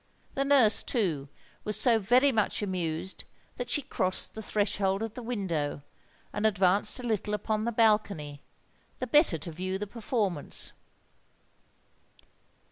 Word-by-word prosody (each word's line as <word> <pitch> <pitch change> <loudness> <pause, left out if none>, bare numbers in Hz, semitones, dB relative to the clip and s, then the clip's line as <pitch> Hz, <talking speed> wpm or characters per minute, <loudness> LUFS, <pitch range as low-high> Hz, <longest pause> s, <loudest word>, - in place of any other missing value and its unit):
The 275 - 0
nurse, 275 -6 +5
too, 165 - -1 0.3
was 210 - -1
so 235 -3 +5
very 250 +7 +4
much 215 -2 0
amused 180 -2 -3 0.3
that 245 -1 -4
she 285 +4 +1
crossed 185 -5 -1
the 220 - -7
threshold 200 -1 0
of 225 -1 -5
the 250 - -7
window, 175 - -3 0.5
and 210 - -3
advanced 200 +3 +2
a - - -7
little 210 -3 -1
upon 215 +1 -2
the 235 - 0
balcony, 210 -10 +1 0.6
the 255 - -3
better 255 - +4
to 165 +2 -7
view 185 +4 -3
the 210 - -4
performance. 205 - -1
210 Hz, 135 wpm, -29 LUFS, 185-230 Hz, 0.6 s, nurse